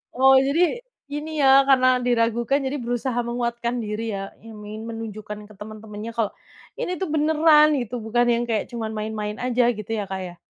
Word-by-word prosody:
Wow, 265 +1 +6
jadi 280 +5 +1 0.5
ini 305 +1 -4
ya, 270 0 +7
karena 260 -2 +5 0.2
diragukan, 235 +2 +1
jadi 270 +2 -2
berusaha 245 +1 -2
menguatkan 235 0 -2
diri 215 +1 -3
ya, 195 0 -6
i - - -13
ingin 210 0 -8
menunjukkan 215 -2 -6
ke 215 - -15
temen-temennya 215 +1 -8
kalau 225 -3 0 0.5
ini - - -2
tuh 380 - -2
beneran 305 0 +5
gitu, 240 -1 -4
bukan 240 +2 +2
yang 235 +1 0
kayak 225 -2 -1
cuman 225 -2 -4
main-main 210 -1 -3
aja, 245 -1 +2
gitu 215 -3 -7
ya, - - -1
Kak, 190 0 -4
ya? 175 0 -12
235 Hz, 175 wpm, -23 LUFS, 215-265 Hz, 0.5 s, ya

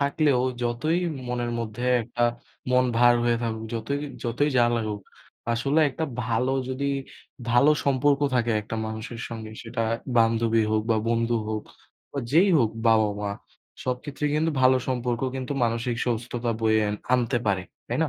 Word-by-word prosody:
থাকলেও 140 -2 +2 0.2
যতই 120 +8 0 0.3
মনের 120 -1 -2
মধ্যে 115 +1 -4 0.2
একটা 120 +1 -1 0.5
মন 125 0 +4
ভার 120 0 +6
হয়ে 120 0 +3
থাকুক, 110 -1 -3
যতই 115 +5 -2 0.3
যতই 120 +5 +1
যা 120 - +6
লাগুক, 110 -2 -2 0.5
আসলে 135 +6 +1
একটা 150 +4 -3 0.2
ভালো 125 +3 0 0.2
যদি 135 +2 -2 0.6
ভালো 120 +5 +5
সম্পর্ক 140 +1 +3
থাকে 120 -2 +2
একটা 110 +2 -5
মানুষের 110 +1 -6
সঙ্গে। 110 -2 -7
সেটা 115 -1 -3 0.3
বান্ধবী 115 0 +3
হোক 110 0 +2
বা 110 - +4
বন্ধু 115 0 +1
হোক 110 -1 -2 0.5
বা 140 - -4
যেই 175 +6 +6
হোক 115 -5 +2 0.2
বাবা-মা, 105 -2 +2 0.5
সবক্ষেত্রে 130 +3 -4
কিন্তু 160 +2 +2
ভালো 130 0 +6
সম্পর্ক 125 -2 -1 0.2
কিন্তু 130 +1 -3
মানসিক 115 +1 -1
সুস্থতা 120 0 -2
বয়ে 110 -1 +3
আন 105 - -1 0.2
আনতে 120 0 +1
পারে। 95 -3 +1 0.3
তাই - - -1
না? - - -2
120 Hz, 155 wpm, -25 LUFS, 115-130 Hz, 0.6 s, ভার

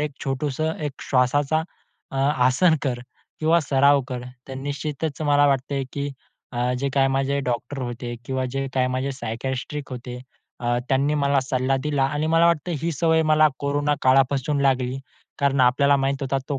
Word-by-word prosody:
एक 150 -1 -1
छोटसं 145 +3 -1
एक 140 - -4 0.2
श्वासाचा, 140 +4 +2 0.5
अ, 135 - -6
आसन 135 +4 +3
कर 125 -4 -1 0.4
किंवा 165 +2 +4
सराव 140 0 +4
कर. 125 -1 -4 0.3
तर 135 - -6
निश्चितच 145 +2 -4
मला 145 -1 +4
वाटतंय 135 0 0
की 140 0 -3 0.4
अ, 125 +1 0
जे 140 - -1
अ, - - -1
काही 135 -1 +4
माझे 135 +1 0
डॉक्टर 125 +3 -3
होते 120 0 -5
किंवा 130 0 -2
जे 135 0 -2
काही 130 -1 +2
माझे 130 +2 -1
सायकायट्रिस्ट 130 +3 -5
होते 125 -1 -7 0.4
अ, 120 0 0
त्यांनी 140 +3 +2
मला 140 -1 +2
सल्ला 130 +1 0
दिला 145 -3 +1
आणि 145 +3 -1
मला 165 +1 +4
वाटतं 170 +1 +1
ही 170 - 0
सवय 160 +1 +2
मला 155 0 +5
कोरोना 145 +1 0
काळापासून 135 +2 +3
लागली, 130 -1 +1 0.4
कारण 140 -1 +2
आपल्याला 140 +3 +4
माहीत 135 0 0
होता, 135 0 0
तो 140 -2 -1
135 Hz, 170 wpm, -23 LUFS, 130-145 Hz, 0.5 s, मला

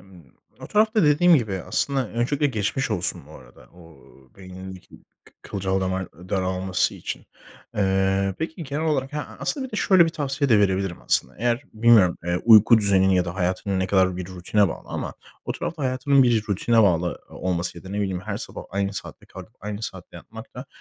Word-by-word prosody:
Imm, 90 -7 -18 0.3
o - - -8
tarafta 215 0 +2
dediğim 165 +4 +5
gibi 110 -7 -2
aslında 130 +6 -1
Öncelikle 135 +5 0
geçmiş 110 +2 -2
olsun 90 - -2
bu 75 - -15
arada 65 -5 -15
o 85 -4 -16 0.4
beynindeki 95 0 -10 0.4
kı - - -20
kılcal 95 -1 -2
damar 95 -1 -3
daralması 95 +2 -1
için. - - -7 0.5
Eee, 95 -1 +1
peki 160 +1 -5
genel 145 +2 -3
olarak 135 -2 -1
he 150 - -3
A - - -7
aslında 270 -2 -2
bir 250 - -17
de - - -3
şöyle 190 -4 +5
bir - - -1
tavsiye 140 -3 -2
de 110 - +6
verebilirim, 95 -2 0
aslında. 65 - 0
Eğer 120 +3 0
bilmiyorum, 110 -5 +5
eee, 85 0 0
uyku 110 0 +7
düzenin 95 -2 +3
ya 90 -1 +3
da 85 - -5
hayatın 95 +1 -1
ne 95 - 0
kadar 95 -2 +2
bir 90 - -5
rutine 95 +2 +1
bağlı - - -8
ama - - -5 0.3
o - - -2
tarafta 160 -3 -5
hayatının 135 +2 +3
bir 115 -4 +2
rutine 115 +3 +3
bağlı 90 -3 +1
o - - -13
olması 90 -1 -3
ya - - -15
da, - - -9
ne 100 +2 -4
bileyim, 95 -3 -2
her - - -4
sabah - - -8
aynı 100 +1 -1
saatte - - -9
kalkıp - - -12
aynı 105 +1 -6
saatte 95 -5 -8
yatmak 110 +6 -12
da 125 +2 -8
100 Hz, 195 wpm, -23 LUFS, 95-130 Hz, 0.5 s, uyku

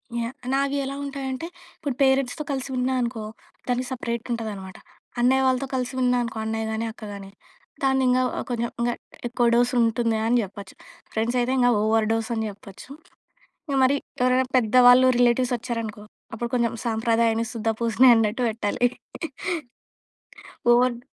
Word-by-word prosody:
Yeah! 235 +2 -3 0.2
నావి 275 +1 +1
ఎలా 275 +1 -4
ఉంటాయి 280 -1 -5
అంటే, 260 +6 -5 0.3
ఇప్పుడు 280 -4 -3
పేరెంట్స్‌తో 270 +1 +2
కలిసి 270 0 -3
ఉన్నానుకో 250 -3 -1 0.4
దానికి 250 0 -1
సెపరేట్ 235 -2 -4
ఉంటదనమాట. 205 -5 -5 0.4
అన్నయ్య 260 +2 +3
వాళ్ళతో 260 +1 +1
కలిసి 250 0 -2
ఉన్నానుకో 245 -2 +1
అన్నయ్య 220 0 -2
గాని, 220 +1 -2
అక్క 220 - -14
గానీ, 195 -1 -9 0.5
దాన్ని 265 0 +3
ఇంగా 250 0 +3 0.3
కొంచెం, 235 -1 -1
ఇంగా 240 0 +1 0.3
ఎక్కువ 240 0 0
డోస్ 245 +1 +2
ఉంటుంది 230 0 +1
అని 235 +2 +3
జెప్పొచ్చు. 200 0 -10 0.4
ఫ్రెండ్స్ 230 +3 0
అయితే 245 +1 0
ఇంకా 245 0 +4
ఓవర్ 220 0 +2
డోస్ 225 0 -1
అని 220 0 -1
జేప్పొచ్చు. 200 +2 -12 0.8
ఇక 280 - 0
మరి 260 +2 +4 0.3
ఎవరైనా 255 +1 +3
పెద్దవాళ్ళు 250 +2 +6
రిలేటివ్స్ 245 +1 +3
వచ్చారనుకో, 230 -3 -5 0.3
అప్పుడు 235 +2 -3
కొంచెం 235 -2 +1
సాంప్రదాయాన్ని 230 0 +1
సుద్ద 225 -1 -2
పూసని 235 +2 +5
అన్నట్టు 225 +2 +1
పెట్టాలి. 220 +2 0 1.9
ఓవర్డ్ 240 0 +2
240 Hz, 140 wpm, -24 LUFS, 225-255 Hz, 1.9 s, పెద్దవాళ్ళు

